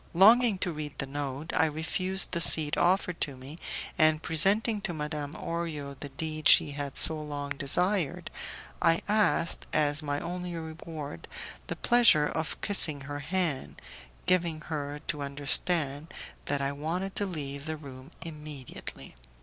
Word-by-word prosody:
Longing 220 +3 +6
to 175 - -2
read 150 -2 -7
the 140 - -2
note, 145 +2 -5
I 160 - +4
refused 185 +5 0
the 170 - 0
seat 150 -3 +7
offered 180 -1 +1
to 140 -4 -2
me, 140 +6 -9 0.4
and 155 0 +4
presenting 205 +6 +3
to 175 -3 -3
Madame 150 0 -4
Orio 160 -4 -4
the 145 - -7
deed 155 +3 -1
she 160 -3 +7
had 140 -1 -5
so 155 -1 0
long 145 -1 -6
desired, 165 +4 -1 0.5
I 165 0 +3
asked, 205 -5 +2
as 150 0 +3
my 145 -1 -2
only 180 +1 -5
reward, 160 -2 -8 0.4
the - - -4
pleasure 235 -11 +4
of 160 +1 -3
kissing 155 -8 +6
her 145 +1 -6
hand, 165 -3 -2 0.5
giving 170 -4 +1
her 145 -1 -5
to 150 -2 -3
understand 145 +2 -1 0.3
that 145 -1 -1
I 140 0 -1
wanted 170 +7 -4
to 205 - 0
leave 140 -4 -6
the 155 0 -3
room 135 -2 -11 0.2
immediately. 150 - -8
155 Hz, 150 wpm, -28 LUFS, 145-175 Hz, 0.5 s, seat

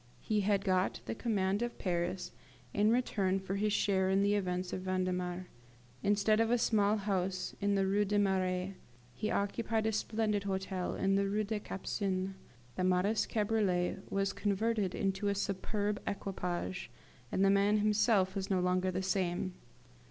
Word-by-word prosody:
He 215 -1 +1
had 200 0 +1
got 185 -1 +1
the - - -3
command 205 -3 0
of 240 0 -3
Paris 180 0 -2 0.4
in 210 +1 +3
return 200 -6 +1
for 190 0 -4
his 210 +2 +1
share 190 -2 +2
in 195 +1 +3
the 205 0 +3
events 180 -2 -1
of 185 - -3
Vendemiaire. 185 -1 -1 0.6
Instead 205 +1 +3
of 225 0 +3
a 245 - +4
small 215 -2 +3
house 190 -2 -2
in 200 0 +2
the 195 -1 +2
Rue 200 +2 +2
des 205 +1 0
Marais, 190 -1 +1 0.4
he 215 - -3
occupied 220 +2 0
a 220 - +2
splendid 215 -1 0
hotel 190 -1 -2
in 195 0 +1
the 195 0 +2
Rue 210 +2 +1
des 210 +1 -2
Capucines; 195 -1 -2 0.5
the - - 0
modest 185 +4 +2
cabriolet 205 -5 +1
was 195 0 0
converted 210 -1 0
into 195 +1 -1
a 200 - +1
superb 205 +1 -1
equipage, 180 - -3 0.4
and 195 - +2
the 195 - +5
man 200 +1 +4
himself 210 -2 +3
was 195 -1 -3
no 190 -2 +2
longer 180 +1 +1
the 185 +1 -2
same. 185 -1 -1
195 Hz, 165 wpm, -33 LUFS, 185-210 Hz, 0.6 s, the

